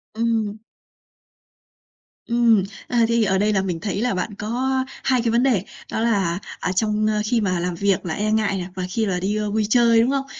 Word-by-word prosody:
Ừm. 225 Hz, -2 st, 0 dB, 1.7 s
Ừm, 235 Hz, -4 st, +4 dB, 0.2 s
ờ, 245 Hz, -, -1 dB
thì, 230 Hz, -1 st, +2 dB
ở 190 Hz, -1 st, +2 dB
đây 210 Hz, +2 st, +2 dB
là 190 Hz, -, +2 dB
mình 180 Hz, -3 st, -3 dB
thấy 200 Hz, +2 st, -3 dB
là 245 Hz, -2 st, +1 dB
bạn 195 Hz, +3 st, -3 dB
có 235 Hz, +6 st, -2 dB, 0.3 s
2 255 Hz, -3 st, +2 dB
cái 230 Hz, -, 0 dB
vấn 235 Hz, +2 st, +3 dB
đề, 235 Hz, -9 st, +2 dB, 0.3 s
đó -, -, -2 dB
là, 195 Hz, -6 st, +1 dB, 0.2 s
à, 180 Hz, -, -1 dB
trong 215 Hz, +2 st, +1 dB, 0.2 s
khi 230 Hz, +1 st, +1 dB
mà 185 Hz, -4 st, 0 dB
làm 180 Hz, 0 st, -2 dB
việc 195 Hz, 0 st, 0 dB
là 160 Hz, -, -2 dB
e 210 Hz, +3 st, -1 dB
ngại 215 Hz, -3 st, +1 dB
nè, 180 Hz, -1 st, -4 dB
và 185 Hz, -, -3 dB
khi 220 Hz, +3 st, 0 dB
mà 180 Hz, -2 st, -1 dB
đi, 195 Hz, +3 st, -1 dB
ơ, 210 Hz, -1 st, -2 dB
vui 215 Hz, 0 st, +1 dB
chơi 230 Hz, -1 st, +5 dB
đúng 240 Hz, -, +2 dB
không? 275 Hz, -1 st, 0 dB
215 Hz, 215 wpm, -22 LUFS, 190-230 Hz, 1.7 s, chơi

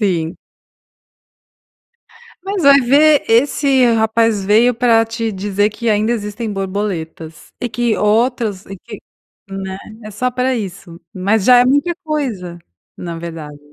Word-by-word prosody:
Sim. 175 Hz, -5 st, -1 dB, 2.1 s
Mas 390 Hz, -2 st, -3 dB
vai 280 Hz, 0 st, +6 dB
ver 290 Hz, +4 st, +4 dB
esse 265 Hz, +2 st, +3 dB
rapaz 220 Hz, -2 st, +1 dB
veio 225 Hz, +5 st, +3 dB
pra 230 Hz, -1 st, +3 dB
te 225 Hz, 0 st, -4 dB
dizer 205 Hz, +1 st, -1 dB
que 230 Hz, +2 st, -4 dB
ainda 215 Hz, +2 st, +1 dB
existem 210 Hz, 0 st, -4 dB
borboletas. 185 Hz, -5 st, -5 dB
E 245 Hz, -, -2 dB
que 235 Hz, 0 st, -1 dB
outras 215 Hz, -2 st, 0 dB
e 195 Hz, -, -9 dB
que, 210 Hz, +2 st, -11 dB, 0.5 s
né. 190 Hz, -1 st, -6 dB, 0.3 s
É 215 Hz, -, -9 dB
só 250 Hz, +5 st, -2 dB
pra 255 Hz, +1 st, -1 dB
isso. 180 Hz, -5 st, -7 dB
Mas 200 Hz, +2 st, 0 dB
já 250 Hz, -1 st, +7 dB
é 245 Hz, -, +5 dB
muita 285 Hz, +7 st, +1 dB
coisa, 240 Hz, -, -4 dB, 0.4 s
na 170 Hz, -2 st, -6 dB
verdade. 160 Hz, -3 st, -8 dB
220 Hz, 135 wpm, -17 LUFS, 195-245 Hz, 2.1 s, já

